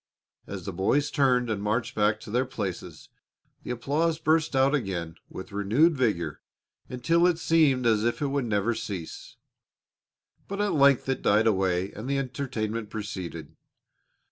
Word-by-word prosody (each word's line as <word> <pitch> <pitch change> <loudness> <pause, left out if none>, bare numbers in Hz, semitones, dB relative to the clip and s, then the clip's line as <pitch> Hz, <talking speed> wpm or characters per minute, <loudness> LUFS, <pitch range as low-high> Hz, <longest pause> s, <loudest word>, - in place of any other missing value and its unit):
As 95 -3 -7
the 100 - -4
boys 140 +11 +1
turned 125 -4 +2
and 110 -3 -2
marched 105 +4 -1
back 105 0 +1
to - - -9
their 125 +3 +1
places 90 -9 -6 0.5
the - - -10
applause 145 +7 0
burst 160 -2 +1
out 135 +1 +3
again 95 - -2 0.2
with 95 - -9
renewed 110 +12 +3
vigor 95 - -1 0.5
until 165 +8 +2
it 175 -2 +2
seemed 155 -7 +3
as 110 -2 +3
if 120 +5 0
it 150 - -1
would 140 -2 -1
never 105 +1 0
cease. 95 -7 -7 1.1
But 200 +1 -5
at 205 0 +1
length 140 -3 +4
it 135 -1 -1
died 105 +2 +3
away 95 -3 +1
and 110 +6 -7
the 140 - +1
entertainment 120 -5 -3
proceeded. 90 -7 -6
115 Hz, 155 wpm, -27 LUFS, 100-140 Hz, 1.1 s, length